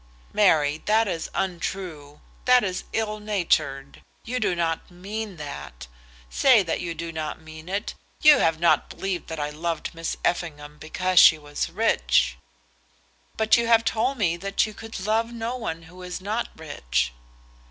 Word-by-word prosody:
"Mary, 155 Hz, -7 st, +3 dB
that 220 Hz, +1 st, +4 dB
is 165 Hz, -4 st, -3 dB
untrue, 175 Hz, -5 st, -4 dB, 0.2 s
that 250 Hz, -1 st, +6 dB
is 185 Hz, -2 st, -3 dB
ill 215 Hz, -1 st, -2 dB
natured. 170 Hz, -9 st, -1 dB, 0.2 s
You 250 Hz, +2 st, -2 dB
do 200 Hz, -6 st, +1 dB
not 165 Hz, -1 st, -1 dB
mean 200 Hz, +2 st, -6 dB
that. 145 Hz, -, -8 dB, 0.4 s
Say 235 Hz, -, +5 dB
that 165 Hz, -, -2 dB
you 170 Hz, -1 st, -4 dB
do 165 Hz, +1 st, -5 dB
not 155 Hz, -2 st, -4 dB
mean 160 Hz, +1 st, -11 dB
it. 200 Hz, +3 st, -2 dB, 0.3 s
You 300 Hz, -1 st, +8 dB
have 165 Hz, -1 st, +2 dB
not 170 Hz, -, +3 dB
believed 190 Hz, -3 st, -4 dB
that 160 Hz, -1 st, -5 dB
I 145 Hz, 0 st, -2 dB
loved 165 Hz, +1 st, -3 dB
Miss 165 Hz, 0 st, -4 dB
Effingham 150 Hz, -4 st, -2 dB
because 185 Hz, +3 st, +2 dB
she 155 Hz, -, +8 dB
was 145 Hz, -1 st, -4 dB
rich." -, -, +2 dB, 1.0 s
"But 220 Hz, +1 st, +4 dB
you 235 Hz, 0 st, 0 dB
have 230 Hz, -1 st, +5 dB
told 255 Hz, +5 st, 0 dB
me 175 Hz, -6 st, +1 dB
that 195 Hz, +2 st, 0 dB
you 215 Hz, -, -7 dB
could 225 Hz, +1 st, -8 dB
love 220 Hz, +4 st, 0 dB
no 235 Hz, +1 st, -3 dB
one 165 Hz, -9 st, -4 dB
who 180 Hz, +3 st, -14 dB
is 180 Hz, -1 st, -5 dB
not 215 Hz, +5 st, -2 dB
rich." 105 Hz, -, -2 dB
175 Hz, 165 wpm, -25 LUFS, 155-215 Hz, 1.0 s, You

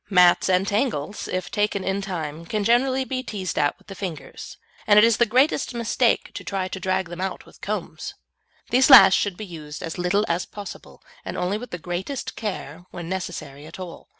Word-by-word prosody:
Mats 180 Hz, -2 st, +5 dB
and 185 Hz, +1 st, +3 dB
tangles, 205 Hz, -, -1 dB
if 185 Hz, -1 st, -3 dB
taken 205 Hz, -2 st, 0 dB
in 195 Hz, +1 st, -1 dB
time, 165 Hz, -4 st, -5 dB
can 210 Hz, +2 st, -1 dB
generally 260 Hz, +4 st, +2 dB
be 260 Hz, -1 st, -2 dB
teased 200 Hz, -7 st, -4 dB
out 145 Hz, -, +1 dB
with -, -, -26 dB
the 195 Hz, -, -9 dB
fingers, 180 Hz, -7 st, -7 dB, 0.3 s
and 205 Hz, -1 st, +6 dB
it 210 Hz, -, +9 dB
is 230 Hz, -2 st, +3 dB
the 240 Hz, -, +3 dB
greatest 260 Hz, +2 st, +2 dB
mistake 235 Hz, -1 st, +1 dB
to -, -, -7 dB
try 195 Hz, -1 st, -2 dB
and 185 Hz, -, -5 dB
drag 185 Hz, 0 st, 0 dB
them 175 Hz, +1 st, -7 dB
out 190 Hz, -, -4 dB
with -, -, -19 dB
combs. -, -, -4 dB, 0.6 s
These 260 Hz, +3 st, +5 dB
last 195 Hz, -9 st, +10 dB
should 195 Hz, -2 st, +1 dB
be 215 Hz, -, -6 dB
used 155 Hz, -5 st, -8 dB
as 165 Hz, +2 st, -5 dB
little 190 Hz, +4 st, +2 dB
as 170 Hz, +1 st, -1 dB
possible, 205 Hz, -1 st, -10 dB, 0.2 s
and -, -, -5 dB
only 195 Hz, +4 st, -1 dB
with 245 Hz, -, -8 dB
the 175 Hz, -, -5 dB
greatest 180 Hz, -, -4 dB
care 180 Hz, -5 st, -5 dB
when 170 Hz, -1 st, -7 dB
necessary 175 Hz, -6 st, -5 dB
at 165 Hz, -, -11 dB
all. 180 Hz, -2 st, -9 dB
190 Hz, 205 wpm, -24 LUFS, 175-215 Hz, 0.6 s, last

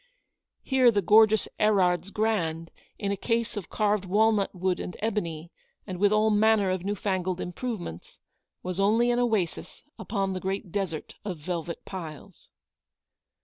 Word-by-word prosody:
Here 260 Hz, -2 st, +4 dB
the 205 Hz, -3 st, +1 dB
gorgeous 220 Hz, +1 st, +5 dB
Erard's 190 Hz, -3 st, +2 dB
grand, 180 Hz, -7 st, -1 dB, 0.3 s
in 200 Hz, -2 st, -2 dB
a -, -, 0 dB
case 230 Hz, +3 st, -1 dB
of 205 Hz, -5 st, -6 dB
carved 210 Hz, -2 st, +1 dB
walnut 205 Hz, +1 st, +2 dB
wood 185 Hz, 0 st, 0 dB
and 180 Hz, -, -6 dB
ebony, 175 Hz, -7 st, -3 dB, 0.3 s
and 185 Hz, -3 st, -6 dB
with 205 Hz, +1 st, +4 dB
all 215 Hz, +1 st, +3 dB
manner 210 Hz, -2 st, +3 dB
of 185 Hz, -1 st, -2 dB
newfangled 190 Hz, -2 st, -2 dB
improvements, 180 Hz, -, -6 dB, 0.5 s
was 185 Hz, +1 st, -3 dB
only 225 Hz, +5 st, +3 dB
an 240 Hz, -, +1 dB
oasis 220 Hz, -8 st, -1 dB, 0.2 s
upon 195 Hz, -3 st, -2 dB
the 185 Hz, -, -3 dB
great 190 Hz, -1 st, -4 dB
desert 185 Hz, -5 st, -3 dB
of 190 Hz, -5 st, -4 dB
velvet 170 Hz, +1 st, -5 dB
piles. 165 Hz, -6 st, -9 dB
195 Hz, 145 wpm, -27 LUFS, 180-215 Hz, 0.5 s, gorgeous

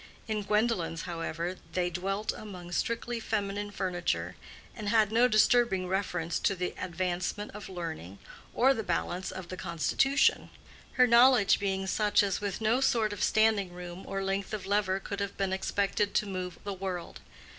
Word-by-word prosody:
In 215 Hz, -1 st, -1 dB
Gwendolen's, 210 Hz, -5 st, 0 dB
however, 170 Hz, +1 st, -4 dB, 0.2 s
they 180 Hz, -1 st, 0 dB
dwelt 195 Hz, +4 st, -2 dB
among 180 Hz, -4 st, -9 dB
strictly 230 Hz, +5 st, -1 dB
feminine 205 Hz, -2 st, -2 dB
furniture, 185 Hz, -3 st, -2 dB, 0.4 s
and 210 Hz, -2 st, -4 dB
had 215 Hz, -1 st, +3 dB
no 235 Hz, +3 st, +5 dB
disturbing 215 Hz, -4 st, +3 dB
reference 180 Hz, -3 st, -1 dB
to 195 Hz, -, +1 dB
the 180 Hz, 0 st, -3 dB
advancement 185 Hz, +3 st, -3 dB
of 210 Hz, -1 st, -9 dB
learning 160 Hz, -, -6 dB, 0.4 s
or 265 Hz, +3 st, +5 dB
the 225 Hz, -, -3 dB
balance 180 Hz, -1 st, -2 dB
of 185 Hz, -2 st, -7 dB
the 185 Hz, -, -6 dB
constitution; 270 Hz, -, +2 dB, 0.4 s
her 255 Hz, -, +5 dB
knowledge 240 Hz, -3 st, +6 dB
being 195 Hz, -1 st, -1 dB
such 210 Hz, +2 st, +3 dB
as 195 Hz, -1 st, -1 dB
with 200 Hz, 0 st, -3 dB
no 225 Hz, +4 st, +2 dB
sort 220 Hz, -5 st, +2 dB
of 205 Hz, -, -7 dB
standing 215 Hz, -4 st, +3 dB
room 180 Hz, +1 st, -8 dB
or 195 Hz, 0 st, -3 dB
length 195 Hz, +2 st, -2 dB
of 205 Hz, -, -7 dB
lever 195 Hz, -1 st, +1 dB
could 200 Hz, +1 st, -5 dB
have 200 Hz, 0 st, -3 dB
been 195 Hz, -1 st, 0 dB
expected 200 Hz, +1 st, 0 dB
to -, -, +3 dB
move 185 Hz, -2 st, -5 dB
the 200 Hz, -, -3 dB
world. 185 Hz, -2 st, -5 dB
195 Hz, 165 wpm, -30 LUFS, 180-215 Hz, 0.4 s, knowledge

